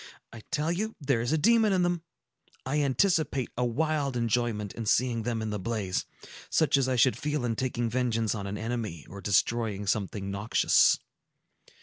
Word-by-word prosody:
I 115 - -9
tell 160 0 0
you 215 +6 -2
there 135 -5 +1
is 120 - -1
a 160 - +3
demon 220 +4 +4
in 185 -1 +2
them! 175 -1 0 0.6
I 145 +3 0
anticipate 140 - +1
a 125 - 0
wild 140 +1 0
enjoyment 115 -3 -1
in 115 -2 -6
seeing 120 0 +2
them 115 -1 -2
in 110 - -3
the 105 - -3
blaze; 95 -2 -2 0.4
such 160 -2 +3
as 135 -2 +2
I 130 - +1
should 125 +1 +4
feel 150 -3 -2
in 115 -2 -1
taking 120 -1 -1
vengeance 115 -2 0
on 100 -2 -4
an 100 +1 -4
enemy, 110 -7 -4
or 100 +1 -9
destroying 105 0 +1
something 100 -1 -2
noxious." 100 +3 +3
120 Hz, 180 wpm, -28 LUFS, 110-145 Hz, 0.6 s, demon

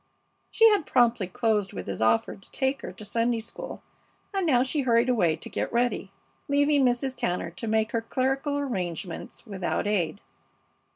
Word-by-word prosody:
She 450 - +6
had 405 -7 +1
promptly 235 -5 +3
closed 215 -1 0
with - - -6
his 100 +1 -4
offer 110 - +2
to 195 - -19
take 265 0 -1
her - - -6
to 215 - -10
Sunday 230 +2 0
school, 225 - -7 0.5
and 385 -3 0
now 250 -5 +4
she 270 +3 -1
hurried 240 -1 +3
away 175 -10 +3
to 160 - -10
get - - -3
ready, 235 -5 0 0.4
leaving 285 0 +3
Mrs. 255 +1 +1
Tanner 175 -5 -2
to 175 +7 -6
make 220 0 +1
her 230 - 0
clerical 270 +4 -1
arrangements 185 - -4
without 195 -4 -2
aid. 200 -4 0
230 Hz, 170 wpm, -27 LUFS, 195-265 Hz, 0.5 s, She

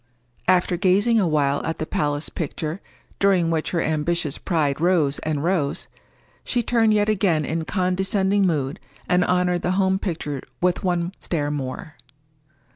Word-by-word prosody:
After 180 -1 +3
gazing 205 +5 +3
a 190 - +2
while 145 -3 +1
at 160 - -3
the 155 - -3
palace 145 -1 -1
picture, 160 +2 -4 0.4
during 185 -4 +3
which 160 -1 -1
her 170 -2 0
ambitious 155 -1 -1
pride 155 -5 0
rose 165 -6 +2
and 150 -2 -2
rose, 170 -5 0 0.6
she 240 - -1
turned 225 -1 +3
yet 210 -1 +2
again 185 -8 +1
in 160 +2 -2
condescending 190 +2 +1
mood, 145 -4 -1 0.3
and 180 0 +3
honored 180 -1 +1
the 180 - 0
home 190 -1 +2
picture 150 -8 -4 0.2
with 180 0 +1
one 175 -1 0
stare 145 -4 -2
more. 140 +2 -5
175 Hz, 150 wpm, -23 LUFS, 155-190 Hz, 0.6 s, After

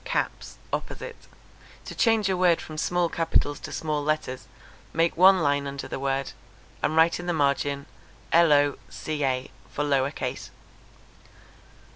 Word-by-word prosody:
caps._ - - -3 0.2
opposite. 480 - -5 0.6
To - - -7
change 225 -3 +2
a 190 - +1
word 180 -2 +3
from 155 - -8
small 175 +1 +1
capitals 165 -3 0
to - - -8
small 150 -2 -2
letters, 150 -4 -2 0.5
make 165 +1 +2
one 185 0 +6
line 145 -1 +1
under 140 0 -6
the - - -5
word, 135 0 -1 0.5
and 155 - 0
write 160 +2 +4
in 175 - -6
the 175 - +1
margin 140 -1 0 0.5
lo. 145 -4 +5
ca., 135 -4 -2 0.2
for 145 - -2
'lower 140 -2 +2
case.' 130 -2 -5
150 Hz, 140 wpm, -26 LUFS, 140-170 Hz, 0.6 s, one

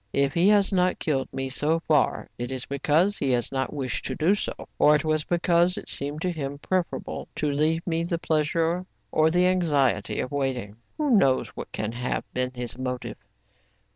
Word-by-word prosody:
If 140 0 +2
he 175 +4 +4
has 205 -2 +4
not 180 -1 +2
killed 135 -4 -1
me 135 0 -3
so 150 +5 0
far, 155 -4 +1
it 120 +1 -3
is 130 -2 -4
because 155 +8 +1
he 140 - 0
has 120 -1 0
not 135 -1 -1
wished 135 -4 -2
to - - -2
do 165 +5 +3
so, 210 - -4
or 150 - +6
it 150 +2 -1
was 155 -1 +1
because 175 +2 +2
it - - -6
seemed 145 +3 -2
to 180 - +1
him 145 -4 -4
preferable 180 +4 -3
to 150 -1 0
leave 155 +3 +1
me 165 -2 0
the 170 0 -1
pleasure 165 +3 0 0.2
or 155 0 +4
the 180 +2 +3
anxiety 160 -8 +1
of 125 - -3
waiting. 130 -7 -2 0.2
Who 300 -3 0
knows 135 -10 +3
what - - -8
can 105 0 -3
have 120 +2 -2
been 125 0 -1
his 120 -1 -5
motive 125 -1 -4
150 Hz, 195 wpm, -26 LUFS, 135-170 Hz, 0.2 s, or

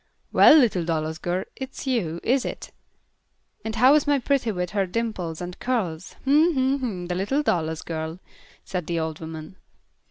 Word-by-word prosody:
"Well, - - +8
little 220 - +3
Dallas 160 -1 -2
girl, 180 +3 -1
it's 265 +1 -7
you, 195 -11 -1
is 255 +2 +2
it? - - -6 0.9
And 220 0 -4
how 255 +4 +6
is 300 -1 +3
my 290 -1 +4
pretty 265 -3 0
with 180 -3 -3
her 200 -2 0
dimples 180 -6 -3
and 180 0 -7
curls? 190 -9 -2
Hm! 305 +5 +4
Hm! 265 +1 +1
Hm! 205 -9 -4
The 180 - -3
little 205 +11 0
Dallas 160 - -1
girl," 160 0 -4 0.5
said 180 -4 -4
the 170 -1 -1
old 160 -1 -3
woman. 160 +2 -8
185 Hz, 170 wpm, -24 LUFS, 165-255 Hz, 0.9 s, Well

